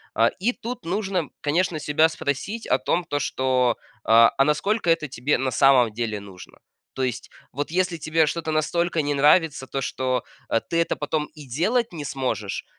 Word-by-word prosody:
А, 115 - +4
и 230 +7 +1
тут 240 -7 -7
нужно, 190 -3 -1
конечно, 160 +2 0
себя 150 +2 +3
спросить 165 - -4
о - - +3
том, 175 - 0
то, 145 -4 -3
что, 130 -3 +1
э, - - -28
а, 115 +4 +5
насколько 185 +6 0
это 165 -2 +1
тебе 135 +2 0
на 130 0 -1
самом 125 -1 +5
деле 110 -1 -3
нужно? 95 -2 -13 0.3
То - - -5
есть, 125 -1 -3 0.2
вот 145 +3 -4
если 180 -1 0
тебе 155 +1 +1
что-то 160 +1 -2
настолько 170 +2 0
не 145 0 -1
нравится, 150 0 +3
то 135 +1 -4
что 130 -2 -1 0.5
ты 165 - 0
это 170 - +1
потом 150 +1 -2
и 150 -3 -12
делать 215 - 0
не 155 -4 -6
сможешь, 125 -7 -3
150 Hz, 180 wpm, -24 LUFS, 130-170 Hz, 0.5 s, а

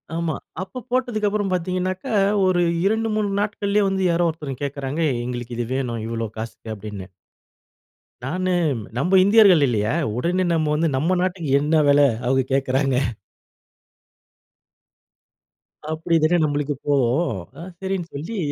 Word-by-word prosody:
ஆமா. 165 -3 -1 0.3
அப்போ 195 +7 -6
போட்டதுக்கு 245 -4 0
அப்புறம் 205 -2 -1
பார்த்தீங்கனாக்க, 185 +3 -2 0.4
ஒரு 180 -1 +2 0.2
2 220 +2 +1
3 210 -1 0
நாட்கள்லயே 205 0 0
வந்து 190 -1 -1
யாரோ 170 0 +2
ஒருத்தர் 145 -5 -6
கேக்கறாங்க, 140 +2 -3 0.2
"எங்களுக்கு 120 -1 -5
இது 120 - -1
வேணும். 120 -4 -2
இவ்வளவு 115 -1 -4
காசுக்கு" 110 0 -6
அப்படின்னு. 100 -2 -8 1.2
நானு, 185 +6 -1 0.5
நம்ம 180 +9 +3
இந்தியர்கள் 200 -6 +6
இல்லையா? 110 -3 0 0.3
உடனே 180 +7 0
நம்ம 155 -2 +1
வந்து 160 +2 +1
நம்ம 170 +7 +1
நாட்டுக்கு 180 -4 -2
என்ன 155 +1 +3
வெல 145 0 +5 0.3
அவங்க 130 +1 +2
கேக்கறாங்க. 135 0 +1 3.0
அப்படி 165 +1 0
தானே 175 +3 +4
நம்மளுக்கு 145 -1 0
தோணும். 135 - +1
நா - - -10 0.2
சரின்னு 190 -3 -3
சொல்லி 165 +11 -5
160 Hz, 125 wpm, -22 LUFS, 135-185 Hz, 3.0 s, இந்தியர்கள்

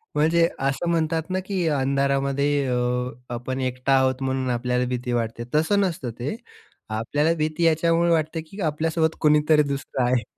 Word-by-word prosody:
म्हणजे 165 +3 +3
असं 135 +5 -1
म्हणतात 160 0 0
ना, 185 - 0
की 185 -4 -1
अंधारामध्ये 140 0 +1
अ, 125 0 0 0.2
आपण 130 +2 -4
एकटा 130 +1 0
आहोत 130 0 +1
म्हणून 130 -1 -1
आपल्याला 125 +1 0
भीती 125 0 -3
वाटते, 115 0 -2
तसं 160 +7 +3
नसतं 165 -10 -2
ते. 135 - -3 0.5
आपल्याला 145 +9 0
भीती 155 +2 -1
याच्यामुळे 165 +1 +3
वाटते, 160 0 0
की 195 +6 -13
आपल्यासोबत 160 +1 0
कुणीतरी 150 0 +4
दुसरं 135 -2 -3
आहे. 120 -1 +1
140 Hz, 150 wpm, -24 LUFS, 125-160 Hz, 0.5 s, कुणीतरी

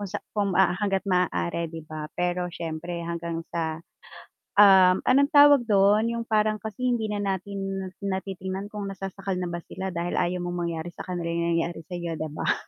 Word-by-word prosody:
kung 205 - -4
sa 200 - -3 0.2
kung 200 -2 +1
hangga't 190 +1 +2
maaari, 170 - 0
'di 160 0 -8
ba? 155 -1 -6
Pero 180 0 0
siyempre 170 +1 -5
hanggang 170 0 -4
sa, 160 -1 -2 0.8
um, 190 -2 +8
anong 280 +2 +4
tawag 285 -2 +8
dun 205 +1 +4
yung 235 0 -2
parang 215 -1 +2
kasi 220 +3 -6
hindi 225 -2 0
na 210 - -2
natin 195 0 -3 0.2
natitingnan 190 0 -4
kung 205 -1 -4
nasasakal 195 0 -4
na 180 - -2
ba 170 0 -4
sila 190 - -5
dahil 170 +1 -2
ayaw 180 +1 0
mong 175 0 -3
mangyari 165 +1 -4
sa - - -7
kanila 175 -2 -3
yung 170 0 0
nangyari, 165 0 -2
sayo 175 -2 -4
'di 155 0 -4
ba? - - +1
185 Hz, 180 wpm, -26 LUFS, 170-200 Hz, 0.8 s, um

